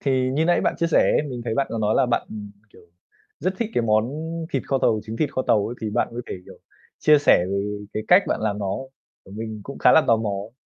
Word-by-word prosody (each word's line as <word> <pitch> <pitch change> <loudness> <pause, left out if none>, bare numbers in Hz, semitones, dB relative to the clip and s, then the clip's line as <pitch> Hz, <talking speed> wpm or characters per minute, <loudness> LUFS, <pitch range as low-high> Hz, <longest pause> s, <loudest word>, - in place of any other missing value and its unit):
Thì 130 -2 +1
như 155 +4 +1
nãy 175 +1 +3
bạn - - 0
chia 170 - +1
sẻ 165 - +3
ấy, - - +2
mình 125 -2 -5
thấy 115 -2 -2
bạn 140 +2 +1
có 115 - -3
nói 105 0 +1
là 130 - +3
bạn, 120 - 0
ừm, 105 -1 -7 0.2
kiểu, - - -18 0.6
rất 185 +2 -1
thích 230 -2 -2
cái 120 - +2
món 110 0 +2 0.5
thịt 135 - 0
kho 135 - +1
tàu, 110 -4 +2
trứng 110 +1 -6
thịt 150 +1 -1
kho 130 - -1
tàu 105 - +3
ấy 120 - -5
thì 110 - -3
bạn - - 0
có 120 +1 -5
thể, - - -5
kiểu, - - -13 0.4
chia 150 -1 +5
sẻ 140 -10 +4
về 100 - 0 0.3
cái 110 - -3
cách 180 +3 +7
bạn - - -1
làm 105 -2 -1
nó? 100 -1 -2 0.5
Tại 95 - -14
mình 110 -1 -6
cũng 140 - -9
khá - - +5
là 160 - +6
tò 115 - +5
mò 110 -2 -2
ấy. 100 +3 -5
115 Hz, 275 wpm, -23 LUFS, 110-140 Hz, 0.6 s, cách